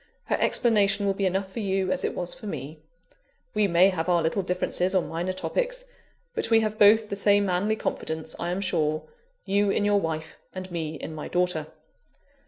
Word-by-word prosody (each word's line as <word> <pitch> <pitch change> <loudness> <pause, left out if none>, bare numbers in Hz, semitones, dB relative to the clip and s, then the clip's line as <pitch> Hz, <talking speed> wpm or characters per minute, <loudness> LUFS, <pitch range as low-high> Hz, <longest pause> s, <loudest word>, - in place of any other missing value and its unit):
Her - - 0
explanation 205 -4 +2
will 195 - +2
be 195 0 0
enough 190 +1 -2
for 230 - -5
you, 190 -2 0
as - - -1
it - - -1
was 175 -1 -1
for 250 -5 -9
me. 155 -3 -6 0.7
We 210 -1 +2
may 180 +1 +5
have 180 -2 -2
our 175 -2 +3
little 165 +5 0
differences 180 +1 0
on 185 - +2
minor 170 +3 -2
topics, - - -2 0.5
but - - -1
we 225 -1 +5
have 215 0 -2
both 215 +1 +6
the - - -1
same 205 0 +3
manly 195 +4 +1
confidence, 160 -6 -4
I 170 - -2
am 180 +2 -2
sure 155 -5 0 0.4
you 200 +1 +2
in 205 +1 +1
your 205 0 +3
wife, 160 -2 -4 0.2
and 185 0 -6
me 160 -2 -3
in 155 +2 -7
my 155 - -6
daughter. 175 -4 0
190 Hz, 195 wpm, -26 LUFS, 170-205 Hz, 0.7 s, both